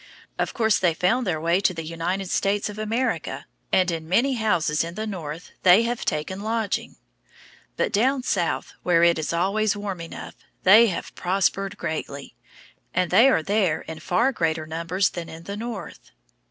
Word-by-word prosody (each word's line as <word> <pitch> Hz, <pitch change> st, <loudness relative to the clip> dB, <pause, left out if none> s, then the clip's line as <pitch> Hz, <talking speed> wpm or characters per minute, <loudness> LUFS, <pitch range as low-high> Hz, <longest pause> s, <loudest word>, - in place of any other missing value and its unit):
Of -, -, -1 dB
course 220 Hz, -3 st, +2 dB
they 175 Hz, -3 st, +2 dB
found 230 Hz, +8 st, +1 dB
their 160 Hz, -4 st, 0 dB
way 170 Hz, +3 st, +2 dB
to 190 Hz, -2 st, +1 dB
the 165 Hz, -1 st, -5 dB
United 175 Hz, +4 st, -3 dB
States 205 Hz, +1 st, 0 dB
of 210 Hz, +1 st, -8 dB
America, 225 Hz, +4 st, -2 dB, 0.3 s
and 185 Hz, -1 st, +3 dB
in 160 Hz, -1 st, -5 dB
many 255 Hz, +9 st, +3 dB
houses 175 Hz, -10 st, +1 dB
in 170 Hz, +1 st, -6 dB
the 215 Hz, +1 st, -3 dB
North 170 Hz, -5 st, -6 dB
they 185 Hz, +5 st, +6 dB
have 240 Hz, 0 st, -2 dB
taken 155 Hz, +6 st, -2 dB
lodging. 220 Hz, -1 st, -2 dB, 0.8 s
But -, -, 0 dB
down 255 Hz, +5 st, +2 dB
South, 170 Hz, -, -1 dB
where 170 Hz, -1 st, +3 dB
it 170 Hz, -1 st, +4 dB
is 155 Hz, -, -2 dB
always 200 Hz, +5 st, +1 dB
warm 200 Hz, -4 st, -4 dB
enough, 165 Hz, -, -8 dB, 0.3 s
they 215 Hz, +5 st, +8 dB
have 185 Hz, -, -4 dB
prospered 195 Hz, +1 st, 0 dB
greatly, 140 Hz, -3 st, -5 dB, 0.6 s
and 180 Hz, -1 st, +1 dB
they 255 Hz, +4 st, +7 dB
are 165 Hz, -12 st, +2 dB
there 195 Hz, -4 st, +1 dB
in 160 Hz, -1 st, -8 dB
far 230 Hz, +11 st, +1 dB
greater 160 Hz, -8 st, -1 dB
numbers 170 Hz, +4 st, -1 dB
than 170 Hz, -2 st, -6 dB
in 160 Hz, +1 st, -10 dB
the 200 Hz, +3 st, -6 dB
North. 230 Hz, +2 st, -7 dB
185 Hz, 175 wpm, -24 LUFS, 165-215 Hz, 0.8 s, they